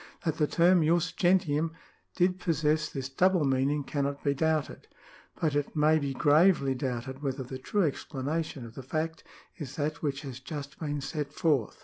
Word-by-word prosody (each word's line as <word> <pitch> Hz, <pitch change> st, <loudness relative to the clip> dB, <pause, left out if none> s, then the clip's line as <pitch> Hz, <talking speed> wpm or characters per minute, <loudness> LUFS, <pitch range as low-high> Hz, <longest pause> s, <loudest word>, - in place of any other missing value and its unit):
That 160 Hz, -1 st, 0 dB
the 150 Hz, -, +2 dB
term 175 Hz, +2 st, +4 dB
jus 170 Hz, +2 st, +2 dB
gentixim 165 Hz, -4 st, +2 dB, 0.4 s
did 180 Hz, 0 st, +2 dB
possess 155 Hz, -2 st, +1 dB
this 135 Hz, -2 st, -4 dB
double 180 Hz, +4 st, +2 dB
meaning 135 Hz, +2 st, +1 dB
cannot 140 Hz, 0 st, -2 dB
be 140 Hz, -, +2 dB
doubted; 155 Hz, +1 st, -1 dB, 0.5 s
but 155 Hz, -3 st, +1 dB
it 145 Hz, 0 st, -1 dB
may 155 Hz, +1 st, +4 dB
be 140 Hz, -2 st, -3 dB
gravely 150 Hz, -1 st, +4 dB
doubted 130 Hz, +1 st, -4 dB
whether 135 Hz, -2 st, -2 dB
the 130 Hz, +1 st, -7 dB
true 200 Hz, +9 st, 0 dB
explanation 145 Hz, -1 st, -3 dB
of 115 Hz, -, -11 dB
the 135 Hz, -, -8 dB
fact 155 Hz, +5 st, -3 dB, 0.3 s
is 145 Hz, -5 st, -7 dB
that 150 Hz, 0 st, -2 dB
which 140 Hz, -2 st, -2 dB
has 130 Hz, -3 st, -7 dB
just 140 Hz, +1 st, -7 dB
been 145 Hz, -2 st, -3 dB
set 145 Hz, 0 st, -4 dB
forth. 145 Hz, -, 0 dB
150 Hz, 170 wpm, -29 LUFS, 135-160 Hz, 0.5 s, term